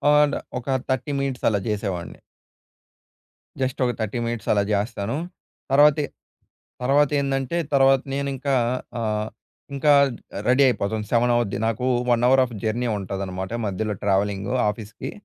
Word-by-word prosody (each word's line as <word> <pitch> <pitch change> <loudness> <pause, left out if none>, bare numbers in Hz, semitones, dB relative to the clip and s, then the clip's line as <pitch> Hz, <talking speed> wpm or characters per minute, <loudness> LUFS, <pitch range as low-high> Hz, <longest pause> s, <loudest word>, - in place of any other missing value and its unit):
And 150 -1 +4 0.2
ఒక 125 - -9 0.2
30 130 +2 -1
minutes 135 -2 -2
అలా 100 -2 +1
చేసేవాడిని. 100 -6 -3 1.4
జస్ట్ 130 -1 -1
ఒక 125 - +1
30 110 +2 -2
మినిట్స్ 115 -1 -4
అలా 100 - +2
చేస్తాను. 105 +4 -1 0.5
తర్వ‌తే 145 +1 +5 0.8
తర్వా‌తేందంటే 140 +1 +1 0.2
తర్వాత 135 -1 +5
నేను 140 0 -1
ఇంకా 135 +1 -1 0.5
ఆహ్, 105 -1 -1 0.5
ఇంకా 145 +1 +3 0.6
రెడీ 130 +3 +5
అయిపోతాను 105 -2 -1
7 120 +1 +3
అవుద్ది 105 -5 -1
నాకు 115 +3 -1 0.2
1 120 0 +3
అవర్ 130 0 +5
ఆఫ్ 120 -2 -7
జర్నీ 120 +3 0
ఉంటుందనమాట 95 0 -5
మధ్యలో 105 +2 -2
ట్రావెలింగ్ 100 0 0 0.2
ఆఫీస్‌కి. 105 +1 -7
120 Hz, 125 wpm, -23 LUFS, 105-135 Hz, 1.4 s, తర్వ‌తే